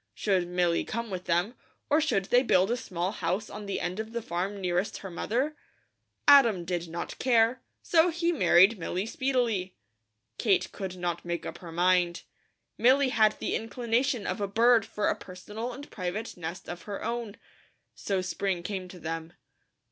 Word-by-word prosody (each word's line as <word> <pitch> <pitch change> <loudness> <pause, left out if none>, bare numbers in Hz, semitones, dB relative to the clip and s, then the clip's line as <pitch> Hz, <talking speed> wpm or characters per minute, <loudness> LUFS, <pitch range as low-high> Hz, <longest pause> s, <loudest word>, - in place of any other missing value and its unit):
Should 190 -4 +1
Milly 175 -1 +1
come 230 -1 -4
with 185 -1 -5
them, 175 +7 +1 0.3
or 305 +1 +3
should 215 -11 +1
they 245 +5 +4
build 195 -5 +3
a - - +2
small 185 -6 -3
house 190 +2 -2
on 210 -1 -7
the 200 - -2
end 180 +3 -3
of 220 +1 -5
the 235 - -2
farm 190 +3 -3
nearest 180 +1 -1
her 190 - -6
mother? 255 - -1 0.7
Adam 235 -11 +7
did 175 -1 -2
not 170 +1 -6
care, 240 0 +3 0.2
so 335 +1 +4
he 340 +1 0
married 195 - +5
Milly 180 +3 -2
speedily. 230 -7 -1 0.6
Kate 200 -6 +2
could 190 -2 -5
not 175 -1 -3
make 170 0 -3
up - - -6
her 170 -2 -9
mind. 175 0 +2 0.6
Milly 260 +3 +5
had 215 -4 +3
the - - -2
inclination 235 +2 0
of 210 - -2
a 200 - 0
bird 230 +2 +4
for 210 - -1
a - - +3
personal 210 +6 -7
and 280 +4 -10
private 200 +4 -4
nest 170 +1 -6
of 175 0 -6
her 200 - -4
own. 235 -3 -3 0.6
So 195 -2 -2
spring 185 -1 -2
came 190 -1 -4
to 180 0 -11
them. 165 +1 -5
200 Hz, 175 wpm, -28 LUFS, 180-235 Hz, 0.7 s, Adam